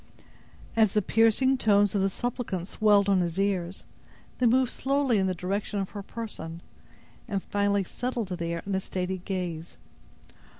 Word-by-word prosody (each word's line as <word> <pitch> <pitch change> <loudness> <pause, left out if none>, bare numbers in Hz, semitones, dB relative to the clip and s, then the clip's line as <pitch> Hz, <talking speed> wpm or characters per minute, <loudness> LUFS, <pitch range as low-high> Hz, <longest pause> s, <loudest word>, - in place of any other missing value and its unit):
As 220 -3 +4
the 210 - +3
piercing 225 +6 +3
tones 205 -3 +4
of 200 - +1
the 195 - +2
suppliant 200 -5 -3
swelled 205 -2 +3
on 195 -2 +4
his 170 +1 -2
ears, 190 -2 -1 0.5
they 250 - +4
moved 255 +1 +3
slowly 270 -4 +1
in 190 - +2
the 185 - -1
direction 200 +4 -2
of 195 - -3
her 205 - -6
person, 175 -6 -7 0.6
and 195 -2 -2
finally 200 -1 +1
settled 240 +1 -3
there 170 -2 -3
in 200 - -3
a 190 - +2
steady 185 0 -3
gaze. 175 -3 -4
200 Hz, 160 wpm, -27 LUFS, 185-225 Hz, 0.6 s, As